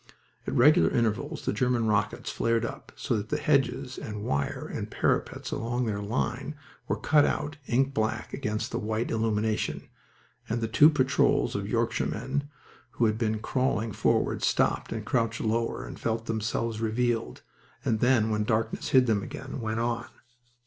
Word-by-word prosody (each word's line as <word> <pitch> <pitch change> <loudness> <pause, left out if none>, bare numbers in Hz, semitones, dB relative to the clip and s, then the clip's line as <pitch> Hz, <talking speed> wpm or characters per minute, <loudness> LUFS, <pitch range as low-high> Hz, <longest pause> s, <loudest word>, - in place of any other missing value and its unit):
At - - -2
regular 120 - +6
intervals 120 +7 -1
the - - +1
German 125 -3 +1
rockets 105 -1 0
flared 115 0 +1
up - - -7
so 125 - -1
that 105 +1 -5
the - - 0
hedges 135 -3 +1
and 105 -1 -6
wire 70 -7 -2
and - - -5
parapets - - -1
along 120 +2 -1
their 105 -2 -2
line 120 +6 -2 0.3
were - - 0
cut 150 -2 +4
out 145 +1 -1
ink 135 +3 +2
black 110 -1 -1
against 105 0 -2
the - - -2
white 110 +2 -2
illumination, 110 -1 -1 0.6
and 115 +2 0
the 115 - -1
two 145 +7 +7
patrols 140 -3 +2
of - - -3
Yorkshiremen 145 0 -1 0.4
who 120 - +2
had 110 0 +1
been 110 -2 +1
crawling 125 -2 0
forward - - +1
stopped - - +1
and - - -4
crouched 115 -2 0
lower 115 +1 -1
and - - -9
felt 115 0 -1
themselves 110 0 -2
revealed, 115 - -1 0.4
and 115 -5 +1
then 120 -3 +3
when 105 0 +1
darkness 110 0 -1
hid 130 -1 +5
them 110 -4 +2
again 130 +5 -6
went 110 0 -2
on. 120 0 -1
115 Hz, 165 wpm, -28 LUFS, 110-125 Hz, 0.6 s, two